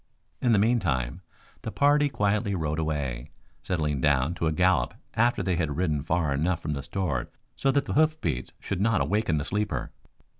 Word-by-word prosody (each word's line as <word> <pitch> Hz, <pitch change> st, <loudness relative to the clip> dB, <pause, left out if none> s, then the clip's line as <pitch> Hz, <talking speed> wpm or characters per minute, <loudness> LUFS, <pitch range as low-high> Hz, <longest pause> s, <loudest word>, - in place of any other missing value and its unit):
In 120 Hz, -, +3 dB
the 110 Hz, -, +5 dB
meantime 90 Hz, -, +1 dB, 0.4 s
the 110 Hz, -, -5 dB
party 145 Hz, +2 st, +3 dB
quietly 105 Hz, -3 st, 0 dB
rode 80 Hz, -2 st, -2 dB
away, 70 Hz, -6 st, -2 dB, 0.3 s
settling 75 Hz, -6 st, -1 dB
down 70 Hz, +2 st, +2 dB
to 85 Hz, -2 st, -1 dB
a -, -, +2 dB
gallop 80 Hz, -6 st, +2 dB, 0.2 s
after 120 Hz, +2 st, +2 dB
they 90 Hz, -3 st, 0 dB
had 80 Hz, -4 st, -1 dB
ridden 80 Hz, -5 st, 0 dB
far 80 Hz, -1 st, 0 dB
enough 85 Hz, +5 st, 0 dB
from 75 Hz, -2 st, -3 dB
the 70 Hz, -, -3 dB
store 70 Hz, -5 st, -2 dB, 0.3 s
so 135 Hz, -, 0 dB
that 140 Hz, +1 st, +2 dB
the -, -, -3 dB
hoofbeats 155 Hz, -, +1 dB
should 100 Hz, -1 st, -3 dB
not 110 Hz, -1 st, +3 dB
awaken 105 Hz, -6 st, +1 dB
the 70 Hz, -, -2 dB
sleeper. 105 Hz, -11 st, -2 dB
85 Hz, 180 wpm, -27 LUFS, 75-105 Hz, 0.4 s, the